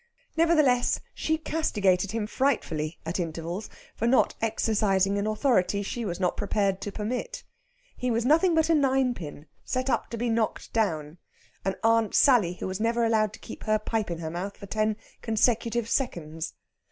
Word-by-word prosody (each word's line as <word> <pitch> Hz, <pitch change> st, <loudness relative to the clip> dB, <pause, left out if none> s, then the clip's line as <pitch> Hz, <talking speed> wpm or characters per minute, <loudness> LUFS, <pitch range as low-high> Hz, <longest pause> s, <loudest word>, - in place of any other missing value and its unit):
Nevertheless, 305 Hz, -7 st, +3 dB
she 315 Hz, 0 st, 0 dB
castigated 205 Hz, -, +1 dB
him 220 Hz, +1 st, -2 dB
frightfully 180 Hz, -, -1 dB
at 165 Hz, +3 st, -2 dB
intervals 170 Hz, +4 st, -4 dB, 0.3 s
for 230 Hz, -, -1 dB
not 255 Hz, +2 st, +4 dB
exercising 205 Hz, -3 st, +1 dB
an 205 Hz, -, -1 dB
authority 215 Hz, -3 st, +1 dB
she 235 Hz, +3 st, -4 dB
was 175 Hz, -2 st, -3 dB
not 180 Hz, -2 st, +1 dB
prepared 200 Hz, -2 st, 0 dB
to 205 Hz, -, -4 dB
permit. 250 Hz, -, -4 dB, 0.5 s
He 250 Hz, -, -2 dB
was 230 Hz, 0 st, 0 dB
nothing 325 Hz, +5 st, +4 dB
but 320 Hz, -1 st, +3 dB
a 330 Hz, -, +3 dB
ninepin, 260 Hz, -, 0 dB, 0.2 s
set 255 Hz, +1 st, -1 dB
up -, -, 0 dB
to 230 Hz, -, -5 dB
be 240 Hz, +2 st, -1 dB
knocked 225 Hz, -1 st, -1 dB
down, 160 Hz, -7 st, -1 dB, 0.4 s
an 195 Hz, 0 st, -1 dB
Aunt 225 Hz, -1 st, +3 dB
Sally 235 Hz, -, +5 dB
who -, -, -6 dB
was 185 Hz, +1 st, -3 dB
never 230 Hz, +1 st, +1 dB
allowed 215 Hz, -2 st, +2 dB
to -, -, -11 dB
keep -, -, -9 dB
her 215 Hz, -1 st, +3 dB
pipe 215 Hz, -1 st, -2 dB
in 170 Hz, -, -3 dB
her 160 Hz, -1 st, -5 dB
mouth 185 Hz, +4 st, -5 dB
for 200 Hz, -, -9 dB
ten 215 Hz, +1 st, 0 dB, 0.2 s
consecutive 230 Hz, 0 st, +1 dB
seconds. 165 Hz, -, -2 dB
215 Hz, 170 wpm, -27 LUFS, 190-245 Hz, 0.5 s, Sally